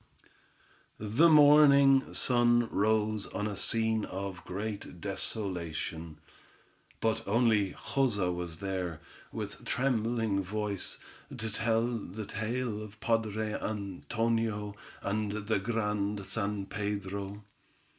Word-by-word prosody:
The 115 Hz, +11 st, +4 dB
morning 145 Hz, -3 st, +7 dB
sun 120 Hz, -1 st, +3 dB
rose 110 Hz, 0 st, +1 dB
on 105 Hz, +2 st, -3 dB
a 105 Hz, -1 st, -2 dB
scene 110 Hz, +1 st, +1 dB
of 95 Hz, -2 st, -5 dB
great 105 Hz, +2 st, -5 dB
desolation, 85 Hz, -5 st, -4 dB, 0.8 s
but 110 Hz, -1 st, +1 dB
only 105 Hz, -3 st, +3 dB
Joza 105 Hz, -10 st, 0 dB
was 85 Hz, -2 st, -5 dB
there, 90 Hz, -4 st, -3 dB, 0.3 s
with -, -, -6 dB
trembling 115 Hz, -5 st, +1 dB
voice, 105 Hz, 0 st, -3 dB, 0.4 s
to 110 Hz, -2 st, -4 dB
tell 115 Hz, 0 st, +2 dB
the 110 Hz, -3 st, -4 dB
tale 110 Hz, +1 st, -2 dB
of 105 Hz, -1 st, -8 dB
the -, -, -12 dB
padre 110 Hz, -2 st, 0 dB
Antonio 110 Hz, +1 st, -2 dB, 0.3 s
and 105 Hz, 0 st, -1 dB
the 110 Hz, -1 st, +1 dB
Grand 105 Hz, -2 st, -1 dB
San 100 Hz, -2 st, -2 dB
Pedro. 100 Hz, 0 st, -4 dB
105 Hz, 105 wpm, -31 LUFS, 100-115 Hz, 0.8 s, morning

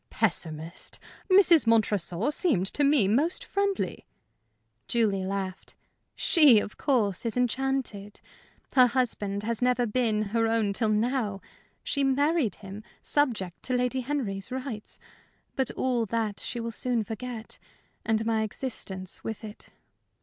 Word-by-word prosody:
"Pessimist! 165 Hz, -5 st, -1 dB, 0.3 s
Mrs. 360 Hz, -8 st, +6 dB
Montresor 210 Hz, -, +2 dB
seemed 295 Hz, -, +2 dB
to 290 Hz, -, +1 dB
me 280 Hz, -8 st, +4 dB
most 285 Hz, -, +1 dB
friendly." 400 Hz, 0 st, -2 dB, 0.8 s
Julie 210 Hz, -5 st, +1 dB
laughed. 190 Hz, -1 st, -5 dB, 0.4 s
"She, 295 Hz, -, +6 dB
of 205 Hz, -, -5 dB
course, 220 Hz, -10 st, +1 dB
is 230 Hz, 0 st, -2 dB
enchanted. 250 Hz, -5 st, -2 dB, 0.5 s
Her 255 Hz, -2 st, +7 dB
husband 210 Hz, -5 st, -1 dB
has 230 Hz, +1 st, -2 dB
never 250 Hz, -1 st, +2 dB
been 220 Hz, -2 st, +1 dB
her 225 Hz, -1 st, +2 dB
own 225 Hz, -3 st, +1 dB
till 220 Hz, +1 st, +1 dB
now. 215 Hz, -2 st, 0 dB, 0.4 s
She 280 Hz, -, 0 dB
married 280 Hz, -, +2 dB
him, 195 Hz, 0 st, -9 dB, 0.2 s
subject 225 Hz, -12 st, 0 dB
to 255 Hz, -, -1 dB
Lady 250 Hz, +1 st, 0 dB
Henry's 240 Hz, -8 st, -3 dB
rights. 255 Hz, -4 st, -6 dB, 0.6 s
But 265 Hz, -2 st, 0 dB
all 245 Hz, -3 st, 0 dB
that 220 Hz, -1 st, -2 dB
she 240 Hz, -, -3 dB
will 230 Hz, 0 st, -3 dB
soon 235 Hz, 0 st, -1 dB
forget 225 Hz, +1 st, -7 dB, 0.4 s
and 220 Hz, 0 st, 0 dB
my 225 Hz, -1 st, +1 dB
existence 200 Hz, -5 st, -5 dB
with 220 Hz, -1 st, -5 dB
it." 210 Hz, -1 st, -10 dB
230 Hz, 130 wpm, -27 LUFS, 205-260 Hz, 0.8 s, Her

